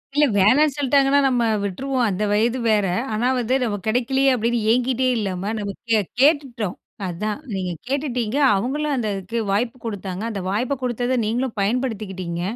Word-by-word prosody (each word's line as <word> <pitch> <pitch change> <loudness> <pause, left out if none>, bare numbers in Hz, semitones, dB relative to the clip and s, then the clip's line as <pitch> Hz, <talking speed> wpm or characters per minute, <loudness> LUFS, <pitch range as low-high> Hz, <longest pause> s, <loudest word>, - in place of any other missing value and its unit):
இல்ல 295 0 +5
வேணாம்ன்னு 260 +10 +4
சொல்லிட்டாங்கன்னா 280 0 +3
நம்ம 250 -3 +1 0.2
விட்டுருவோம் 250 +5 -1
அந்த 200 0 -1
வயது 230 +4 +2
வேற. 205 -2 +2 0.3
ஆனா 225 +3 +1
வந்து 245 +2 0
நமக்கு 205 -4 -3
கிடைக்கலையே 265 +4 +2
அப்டின்னு 235 0 0
ஏங்கிட்டே 255 +1 +1
இல்லாம 195 0 -2
நம்ம 200 -1 -3 0.2
கே 220 - +5 0.2
கேட்டுட்டோம். 270 - +2 0.3
அதான் 210 +7 -3
நீங்க 185 -2 -2 0.2
கேட்டுட்டிங்க, 260 -3 -1 0.2
அவங்களும் 285 +9 -1
அந்த 240 -4 -1
அதுக்கு 195 +4 -5
வாய்ப்பு 230 +5 0
கொடுத்தாங்க 195 -3 -4
அந்த 200 -3 -4
வாய்ப்பு 245 +7 0
கொடுத்ததை 245 +1 0
நீங்களும் 235 +2 -2
பயன்படுத்திக்கிட்டிங்க. 200 -6 -2
235 Hz, 150 wpm, -22 LUFS, 205-260 Hz, 0.3 s, இல்ல